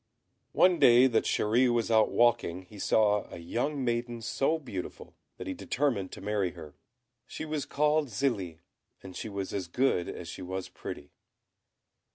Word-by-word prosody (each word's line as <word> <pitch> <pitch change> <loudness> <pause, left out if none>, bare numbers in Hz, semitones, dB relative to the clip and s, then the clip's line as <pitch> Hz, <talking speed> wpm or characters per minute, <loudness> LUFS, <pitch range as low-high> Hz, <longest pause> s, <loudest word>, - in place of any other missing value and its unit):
One 180 -2 +4
day 120 +1 +7
that 120 -4 +2
Chéri 120 +4 +2
was 115 -1 0
out 110 -1 +5
walking 115 -7 +2
he 100 +3 -14
saw 105 0 +2
a - - -7
young 125 - -2
maiden 120 -1 -2
so 140 +8 +1
beautiful, 120 - -7 0.2
that - - -7
he - - -3
determined 125 -9 -1
to - - -8
marry 100 -3 -1
her. 80 -4 -11 0.5
She - - -6
was 155 -2 -3
called 150 +1 +2
Zélie, 105 - -2 0.5
and 95 -1 -10
she 110 - -5
was 100 -2 -5
as 95 -3 -3
good 105 -2 +1
as 85 - -7
she 85 - -7
was 95 +1 -5
pretty. 70 - -8
110 Hz, 165 wpm, -29 LUFS, 95-130 Hz, 0.5 s, day